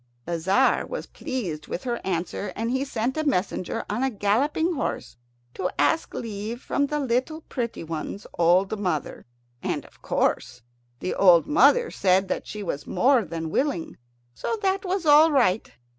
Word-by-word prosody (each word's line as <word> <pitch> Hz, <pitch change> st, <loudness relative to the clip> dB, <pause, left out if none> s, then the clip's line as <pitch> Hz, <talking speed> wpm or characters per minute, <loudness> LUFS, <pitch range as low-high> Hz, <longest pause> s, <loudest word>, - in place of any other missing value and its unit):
The 170 Hz, 0 st, -2 dB
Tzar 195 Hz, +11 st, +2 dB
was -, -, -5 dB
pleased 170 Hz, -13 st, -5 dB
with 175 Hz, -, -5 dB
her 240 Hz, -2 st, -2 dB
answer, 180 Hz, +2 st, -3 dB
and 230 Hz, +2 st, -2 dB
he 260 Hz, +1 st, 0 dB
sent 260 Hz, 0 st, -2 dB
a 310 Hz, -, 0 dB
messenger 190 Hz, -, -1 dB
on 210 Hz, +4 st, -2 dB
a 265 Hz, -, +2 dB
galloping 270 Hz, -, +1 dB
horse 280 Hz, -, -3 dB, 0.4 s
to 180 Hz, -, -2 dB
ask 320 Hz, -, +1 dB
leave 220 Hz, +1 st, -5 dB
from 285 Hz, +2 st, 0 dB
the 300 Hz, +1 st, -1 dB
little 265 Hz, +4 st, -1 dB
pretty 240 Hz, -, -4 dB
one's 165 Hz, +5 st, -5 dB
old 185 Hz, +5 st, +3 dB
mother. 175 Hz, -11 st, -3 dB, 0.3 s
And -, -, -2 dB
of -, -, -20 dB
course -, -, -1 dB, 0.4 s
the 185 Hz, -, -2 dB
old 180 Hz, -4 st, +6 dB
mother 460 Hz, +10 st, +4 dB
said 190 Hz, 0 st, +2 dB
that -, -, -3 dB
she 210 Hz, -1 st, -6 dB
was 145 Hz, -6 st, -4 dB
more 260 Hz, -2 st, +3 dB
than 165 Hz, -2 st, -5 dB
willing. 265 Hz, -, -1 dB, 0.4 s
So 455 Hz, -, -3 dB
that 385 Hz, 0 st, +1 dB
was 375 Hz, -2 st, -2 dB
all 305 Hz, +2 st, +7 dB
right. 230 Hz, -8 st, +2 dB
230 Hz, 165 wpm, -25 LUFS, 185-285 Hz, 0.4 s, all